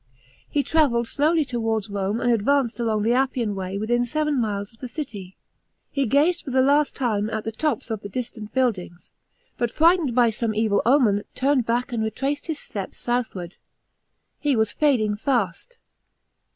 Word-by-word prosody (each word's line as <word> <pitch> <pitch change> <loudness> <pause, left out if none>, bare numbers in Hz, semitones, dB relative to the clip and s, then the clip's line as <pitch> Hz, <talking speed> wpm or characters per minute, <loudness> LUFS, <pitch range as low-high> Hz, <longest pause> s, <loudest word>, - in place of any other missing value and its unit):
He 285 - +1
travelled 260 -8 +2
slowly 305 +4 +2
towards 225 -4 -1
Rom«' 200 +1 -2
and 245 - +2
advanced 235 +1 +1
along 220 -3 0
the 230 +2 +2
Appian 250 -4 0
Way 190 0 -4
within 240 +4 +1
seven 300 +1 0
miles 205 -1 -3
of 225 - -24
the 255 - -6
city. 210 - -7 0.5
He 275 -3 0
gaze! 305 +9 +3
lor - - -3
the 260 - +5
last 290 +1 +3
time 220 -5 0
at 220 -1 -3
the 225 - -3
tons 240 -1 -2
of 220 - -2
the 200 - -7
distant 225 -1 -6
buildings 200 -10 -2 0.5
but 240 - +1
frightened 320 -2 +3
by 240 -2 +4
some 220 0 -2
evil 215 -2 +2
omen, 235 -7 +4
turned 265 -2 +1
back, 240 +2 0
and 225 -2 0
retraced 270 +7 -2
his 320 -3 -2
steps 200 -8 -6
southward. 220 -8 -3 0.8
He 290 -3 +1
was 220 -1 +1
fa'ling 220 -9 +1
fast. 245 - -1
235 Hz, 170 wpm, -24 LUFS, 215-275 Hz, 0.8 s, the